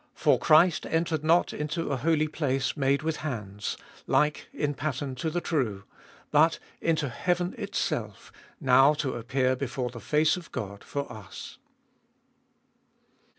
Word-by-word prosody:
24. - - -17
For - - +1
Christ 160 +2 +5
entered 160 -2 0
not 165 +3 +3
Into 150 +2 -3
a 135 - 0
holy 155 +3 +2
place 135 -4 -1
made 140 0 +1
with 160 0 -1
hands, 105 -8 -4 0.3
like 150 0 +1
in 145 -1 -1
pattern 140 -1 -3
to 160 +6 -2
the 175 +2 -2
true; 115 - -1 0.5
but 155 +2 +4 0.2
into 160 -3 +1
heaven 175 +7 -1
itself, - - -3 0.3
now 135 +3 +5
to 145 -3 -2
appear 130 +2 0
before 125 -1 -3
the 120 - -8
face 150 - +2
of 175 -2 -10
God 100 -5 -6
for 140 -2 -4
us. 100 -4 -10
145 Hz, 145 wpm, -28 LUFS, 130-160 Hz, 0.5 s, Christ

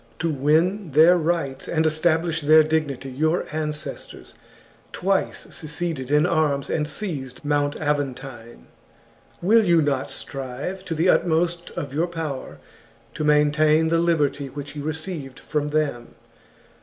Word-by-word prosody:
To 165 0 -1
win 160 +5 +1
their 160 +5 +7
rights 165 -5 -1
and 160 -1 +1
establish 160 +1 +1
their 155 +1 +6
dignity 150 -4 -2
your 155 +6 0
ancestors 150 -1 -5 0.6
twice 195 +1 -1
seceded 155 -4 -4
in 150 +2 +4
arms 155 -5 +1
and 150 -1 0
seized 145 -7 -5
Mount 145 0 +1
Aventine; 135 -5 -4 0.8
will 220 +5 +5
you 170 -4 +4
not 140 -3 0
strive 135 +8 -6
to 165 - -3
the 165 +4 +1
utmost 170 0 +1
of 140 -2 -4
your 165 +4 +1
power 160 -6 -5 0.6
to - - -4
maintain 150 +1 +3
the 165 0 +2
liberty 150 -4 +1
which 145 +2 -8
you 145 - -5
received 155 -3 -4
from 150 -1 -2
them 145 -6 -2
155 Hz, 130 wpm, -23 LUFS, 145-165 Hz, 0.8 s, their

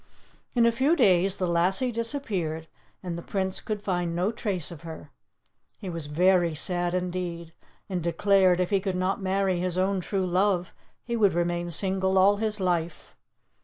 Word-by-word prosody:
In 235 -1 +4
a 235 - +5
few 270 +8 +2
days 190 - +3
the 185 - -2
lassie 180 +8 +1
disappeared, 215 - -3 0.4
and 170 -2 -4
the - - -7
Prince 190 +1 -2
could 210 -2 -4
find 175 -3 -1
no 180 +5 +1
trace 195 -7 -2
of 165 - -10
her. 160 -3 -9 0.7
He 190 -4 -6
was 165 -3 -5
very 175 +1 +3
sad, 175 +2 0
indeed, 175 -2 -4 0.3
and 185 -3 -3
declared 185 +2 +3
if 180 +1 0
he 200 - +3
could 190 -1 -3
not 185 +2 -1
marry 190 -1 0
his 180 0 -1
own 190 +1 +1
true 190 +1 -2
love 180 0 +1 0.3
he 235 - -3
would 205 -4 +3
remain 175 0 -1
single 190 +2 0
all 200 +2 +5
his 215 0 -1
life. 175 -3 -2
185 Hz, 170 wpm, -26 LUFS, 175-195 Hz, 0.7 s, a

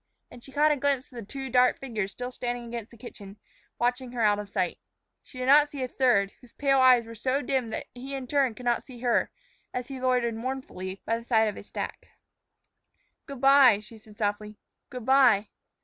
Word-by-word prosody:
And 240 - -13
she 270 - -12
caught 300 +3 +3
a 295 - +1
glimpse 275 -1 -1
of - - -16
the - - -7
two 270 +3 -6
dark 250 0 +4
figures 220 -7 -3
still 250 +4 -6
standing 245 -1 -4
against 235 -1 -6
the 235 - -16
kitchen, 205 -3 -11 0.4
watching 245 +1 -1
her 240 - -3
out 210 -1 +3
of 205 -1 -7
sight. 185 -4 -2 0.4
She 255 - -15
did 255 - -3
not 290 +2 +6
see 280 -3 -5
a - - -2
third, 235 -7 +2
whose 245 - -18
pale 275 -1 +2
eyes 255 -2 +6
were 230 - -10
so 260 +5 -1
dim 260 -3 -1
that - - -4
he 265 +3 -7
in 265 -1 -5
turn 265 -3 +1
could 250 - -10
not 240 -1 +1
see 245 -3 -13
her 245 -2 +1 0.5
as 250 +1 -4
he 265 -2 -7
loitered 250 -2 +1
mournfully 225 -6 -6
by 230 +1 0
the - - -13
side 220 -2 +3
of 205 - -6
a - - -8
stack. - - -6 1.2
"Good 275 -3 -8
by," 270 -5 +7
she 215 +1 -13
said 210 -1 -18
softly; 210 -1 -2 0.3
"good 250 -4 -8
by." 250 -6 +4
245 Hz, 215 wpm, -27 LUFS, 220-265 Hz, 1.2 s, by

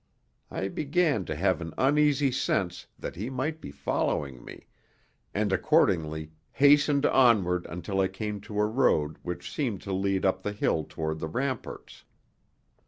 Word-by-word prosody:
I 95 - -3
began 150 - 0
to 80 - -4
have 95 +2 +1
an 80 -1 -6
uneasy 145 0 +3
sense 95 -7 -1
that - - -6
he 105 +7 -4
might 150 +5 -3
be - - -7
following 70 -2 -2
me, - - -11 0.7
and 105 -1 0
accordingly 80 - +1 0.2
hastened 145 0 +4
onward 100 -9 +3
until 90 +3 -4
I 95 - +3
came 105 0 -5
to 105 0 -5
a 105 - +4
road 90 - +1
which 90 0 -6
seemed 120 - -2
to 100 - -4
lead 95 0 0
up 95 0 +1
the 105 +2 -3
hill 80 -6 0
toward 80 0 -3
the 80 - -3
ramparts. 130 - -4
100 Hz, 155 wpm, -28 LUFS, 85-135 Hz, 0.7 s, hastened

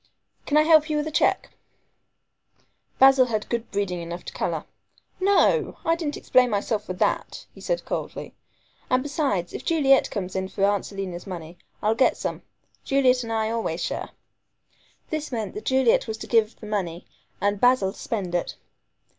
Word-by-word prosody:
"Can 300 - +3
I 305 - +6
help 310 -1 +5
you 305 - 0
with 300 - -1
a 315 - -4
cheque?" - - +1 1.5
Basil 265 -1 +6
had 215 -3 -2
good 235 -1 -2
breeding 195 -4 -2
enough 170 +1 -7
to - - -7
color. - - -2 0.5
"No! 400 +5 +3
I 330 - +3
didn't 315 -4 -3
explain 255 -1 +3
myself 210 0 -1
for 185 - -4
that," 180 - -1
he - - -14
said - - -2
coldly, - - -5 0.6
"and 255 0 +2
besides, 280 - -1
if - - -6
Juliet 275 -5 +3
comes 190 -3 -4
in 190 0 -1
for 195 - -3
Aunt 205 0 +1
Selina's 195 -2 -6
money, 170 -2 -7 0.3
I'll 215 +1 +3
get 255 +3 +2
some. - - -4 0.4
Juliet 260 -2 +3
and 230 -2 -5
I 220 0 0
always 220 -7 -2
share." - - -3 1.0
This 310 -2 -3
meant 225 -4 -3
that 420 - -7
Juliet 260 -3 +3
was 220 0 -4
to - - -7
give 225 -1 +1
the - - -10
money 185 -5 -3 0.3
and 205 0 0
Basil 245 -6 +4
to - - -15
spend 195 -6 -3
it. 175 - -1
225 Hz, 175 wpm, -25 LUFS, 195-275 Hz, 1.5 s, I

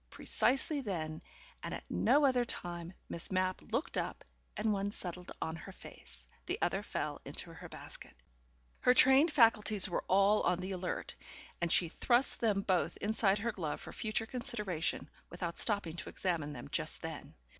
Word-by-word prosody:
Precisely 275 - +1
then, 160 -8 -4 0.4
and - - -4
at - - -8
no 295 0 +4
other 255 -2 +3
time, 175 -6 -5 0.2
Miss 170 - +3
Mapp 185 0 0
looked 250 +8 -1
up, - - -4 0.3
and 215 0 +1
one 200 0 -1
settled 180 -3 -6
on 160 - -3
her 160 - -9
face, 65 -1 -12 0.2
the - - -1
other - - 0
fell - - -4
into - - -1
her - - -10
basket. - - -10 0.6
Her 250 - +4
trained 265 +6 +7
faculties 215 -6 +4
were 175 - -2
all 200 +3 +4
on 180 0 +1
the 185 +1 -4
alert, 185 -1 -4 0.5
and 170 -1 0
she 175 - +4
thrust 240 +9 +2
them 205 -4 +1
both 185 -3 0
inside 210 -1 +2
her 230 +3 -1
glove 165 -8 -4
for - - -9
future 215 0 -1
consideration, 210 -8 -2 0.2
without 170 -1 -2
stopping 200 -7 +2
to 170 - -5
examine 165 -6 -2
them 105 - -8
just - - -1
then. - - -7
195 Hz, 165 wpm, -33 LUFS, 175-225 Hz, 0.6 s, trained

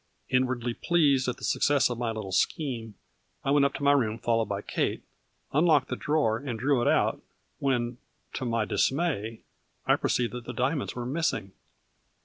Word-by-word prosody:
Inwardly 125 -2 +1
pleased 140 -4 +2
at 125 - -2
the - - -14
success 145 -1 +3
of 120 -1 -4
my 120 -1 -1
little 110 -4 -5
scheme, 115 - -1 0.5
I 135 - +2
went 145 -1 +5
up 140 - 0
to - - -5
my 140 - +5
room 115 -6 +2
followed 115 -1 0
by 100 0 -3
Kate, - - -2 0.5
unlocked 150 -3 +4
the - - -1
drawer 145 -8 +1
and 125 -3 -4
drew 135 +1 +2
it - - +1
out, - - +2 0.4
when, 125 -3 0 0.3
to - - -4
my 115 -3 0
dismay, 130 -6 0 0.4
I - - +4
perceived 120 -1 0
that 125 -1 -6
the 125 - -5
diamonds 130 +4 -1
were 120 -1 -4
missing. 135 - -1
125 Hz, 175 wpm, -28 LUFS, 115-140 Hz, 0.5 s, went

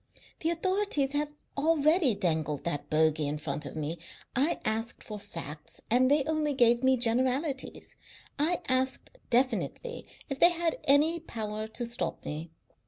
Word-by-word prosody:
The 325 - 0
authorities 340 -5 0
have 295 0 0 0.3
already 310 - +3
dangled 155 -7 -1
that 145 -3 -3
bogey 155 -1 +2
in 150 +1 -2
front 150 -1 -4
of - - -9
me. 155 +2 -3 0.4
I 280 +7 +2
asked 225 +2 -1
for 210 -1 -7
facts 155 -5 -7
and 255 +2 +4
they 290 0 +4
only 305 -1 0
gave 240 -1 +4
me 260 0 +4
generalities. 260 +4 0 0.4
I 335 +4 +2
asked 260 - -1
definitely 260 - 0 0.2
if 275 -2 -4
they 345 - +9
had 335 -1 -1
any 300 +5 +4
power 215 -7 -5
to 235 +2 -5
stop 235 -8 -3
me. 155 +3 -5
255 Hz, 150 wpm, -29 LUFS, -, 0.4 s, they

